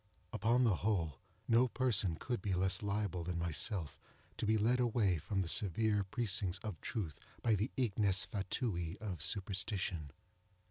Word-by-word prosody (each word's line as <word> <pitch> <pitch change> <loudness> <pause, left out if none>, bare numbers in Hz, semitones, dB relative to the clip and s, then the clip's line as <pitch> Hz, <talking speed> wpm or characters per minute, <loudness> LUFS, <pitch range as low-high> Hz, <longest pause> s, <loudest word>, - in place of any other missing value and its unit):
Upon 120 +3 +3
the 110 -7 +3
whole, 85 -9 0 0.3
no 120 +2 +5
person 105 -9 +1
could 120 +8 -3
be 100 -4 0
less 95 0 +2
liable 100 -4 -1
than 90 0 -3
myself 85 - -2 0.4
to - - -1
be 110 +1 +4
led 120 +4 +3
away 110 -8 +2
from 95 +4 -1
the - - -5
severe 105 +3 +1
precincts 95 -3 0
of 105 -8 -5
truth 80 -10 -3 0.2
by 115 - +4
the 105 +4 +1
ignes 100 -6 +2
fatui 95 -3 -2
of 95 -8 -4
superstition. 95 -4 -1
100 Hz, 150 wpm, -36 LUFS, 90-110 Hz, 0.4 s, no